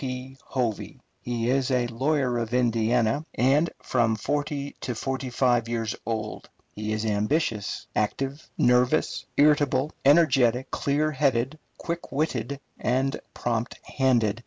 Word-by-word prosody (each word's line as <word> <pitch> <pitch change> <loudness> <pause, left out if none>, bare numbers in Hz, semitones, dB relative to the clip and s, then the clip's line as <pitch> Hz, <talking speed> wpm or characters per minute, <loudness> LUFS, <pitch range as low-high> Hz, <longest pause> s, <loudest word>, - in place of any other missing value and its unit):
P. 130 0 -5
Hovey. 120 -5 -3 0.2
He 120 0 -1
is 135 0 +1
a 125 -2 +2
lawyer 125 +1 0
of 115 +1 -2
Indiana, 115 +2 +2
and 140 +6 +3
from 115 -3 +2
forty 145 +4 -2
to 125 - -3
forty 130 +2 -3
five 120 -2 +2
years 115 -2 -2
old. 110 -2 -4 0.2
He 105 +1 -4
is 110 +1 -1
ambitious, 105 +1 0
active, 135 +7 -2
nervous, 125 +4 +2
irritable, 145 -1 +3
energetic, 130 -5 +4
clear 150 +2 +1
headed, 135 0 0 0.2
quick 170 0 -5
witted, 140 -2 -1 0.2
and 130 +3 0 0.2
prompt 120 0 -2
handed. 120 -6 +1
125 Hz, 125 wpm, -26 LUFS, 115-140 Hz, 0.2 s, energetic